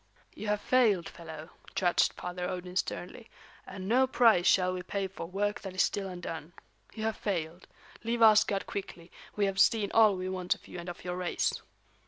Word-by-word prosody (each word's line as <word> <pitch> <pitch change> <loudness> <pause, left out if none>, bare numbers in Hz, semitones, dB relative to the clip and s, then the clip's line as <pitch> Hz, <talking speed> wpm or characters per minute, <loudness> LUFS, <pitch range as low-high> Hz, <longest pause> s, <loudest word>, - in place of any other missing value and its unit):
"You 215 - -7
have 210 0 0
failed, 220 -9 +3
fellow," 160 -1 -10 0.2
judged 175 -2 +2
Father 180 0 -5
Odin 180 0 -6
sternly, 190 +5 -4 0.4
"and 190 -1 -7
no 255 +4 +4
price 225 -8 +4
shall 185 -1 +4
we 180 - -4
pay 195 +2 -3
for 185 -3 -8
work 205 +3 -2
that 190 -2 -7
is 185 - +4
still 195 -1 -2
undone. 170 -3 -7 0.4
You 220 - -5
have 220 -1 -1
failed. 175 -3 -3 0.4
Leave 230 +1 +1
Asgard 215 -2 +5
quickly; 175 -3 -7 0.2
we 205 - +2
have 195 -1 -2
seen 210 -1 +4
all 215 -3 +6
we 185 0 -4
want 185 -1 -1
of - - -19
you 180 - -8
and 175 +1 -7
of 175 - -9
your 180 0 -3
race." 180 -1 0
190 Hz, 190 wpm, -30 LUFS, 180-210 Hz, 0.4 s, all